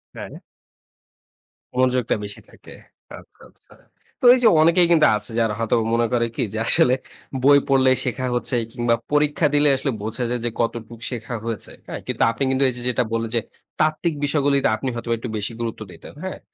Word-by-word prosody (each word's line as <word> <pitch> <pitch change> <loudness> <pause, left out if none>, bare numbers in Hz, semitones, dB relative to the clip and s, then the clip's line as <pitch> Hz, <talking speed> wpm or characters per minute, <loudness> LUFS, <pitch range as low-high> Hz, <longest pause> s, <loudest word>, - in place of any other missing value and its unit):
হ্যাঁ। - - -8 1.4
মনোযোগটা 125 -1 +1
বেশি 100 0 -5
থাকে। - - -16 0.5
আচ্ছা, - - -22
আচ্ছা। - - -19 0.5
তো - - -1
এইযে 245 -2 +3
অনেকেই 170 +2 +4 0.3
আছে 105 +2 -8
যারা 110 -2 +1
হয়তোবা 115 0 +1
মনে 120 0 +2
করে 120 -1 +2
কি? - - -2
যে - - -4
আসলে 125 - +4 0.5
বই 140 +1 +7
পড়লেই 130 -1 +4
শেখা 130 +1 -2
হচ্ছে 125 +1 -1 0.2
কিংবা 120 -1 +1 0.2
পরীক্ষা 150 +2 +2
দিলে 145 0 +5
আসলে 135 +1 -2
বোঝা 110 +3 -3
যায় 120 -1 -2
যে - - +1
কতটুকু 115 -1 -4
শেখা 120 0 -5
হয়েছে। 115 -2 -5 0.2
হ্যাঁ? - - -6
কিন্তু - - -4
আপনি 115 +4 -3
কিন্তু 135 +1 +1
এইযে 125 -1 -6
যেটা 125 0 +1
বললেন 115 0 -1
যে 115 - +2 0.4
তাত্ত্বিক 155 +2 +1
বিষয়গুলিতে 140 -1 +2
আপনি 130 +4 -3
হয়তোবা 115 0 -2
একটু 120 - -6
বেশি 105 +2 -4
গুরুত্ব 115 -2 -4
দিতেন। - - -13
হ্যাঁ? 185 - -5
125 Hz, 175 wpm, -22 LUFS, 115-140 Hz, 1.4 s, বই